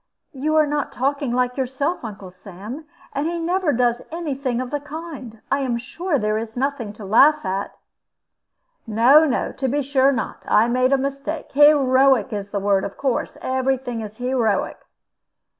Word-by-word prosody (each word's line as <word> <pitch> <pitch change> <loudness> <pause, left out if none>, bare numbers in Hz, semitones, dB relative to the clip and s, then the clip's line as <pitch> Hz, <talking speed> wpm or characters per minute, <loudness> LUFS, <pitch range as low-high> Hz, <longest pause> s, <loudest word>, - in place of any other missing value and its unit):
"You 300 +3 -1
are 310 -1 +5
not 295 -1 -2
talking 275 0 -1
like 250 +1 0
yourself, 265 +6 -2
Uncle 200 -4 -8
Sam. 205 - -9 0.3
And 280 +3 -1
he 340 +1 -2
never 350 0 0
does 240 -1 +1
any 330 -3 -3
thing 260 -3 -2
of 255 -1 -4
the 290 - -1
kind. 290 -6 -9
I 275 - +2
am 255 -4 -1
sure 300 +7 -2
there 215 -2 0
is 225 +1 -7
nothing 265 -5 -2
to 210 -1 -10
laugh 285 +9 +5
at." 195 +1 -3 1.1
"No, 245 +8 +6
no; 265 -5 -1
to 265 - -3
be 285 +3 0
sure 270 0 +3
not. 260 - -4
I 220 +2 +4
made 255 +2 +2
a 275 - +4
mistake. 275 +3 -4
Heroic 270 -5 +4
is 200 -1 -4
the 200 - -2
word, 195 -1 +1
of 200 - -6
course 265 -4 -2
every 260 +1 0
thing 245 -3 -5
is 215 0 -8
heroic." 245 -5 0
260 Hz, 175 wpm, -22 LUFS, 230-285 Hz, 1.1 s, No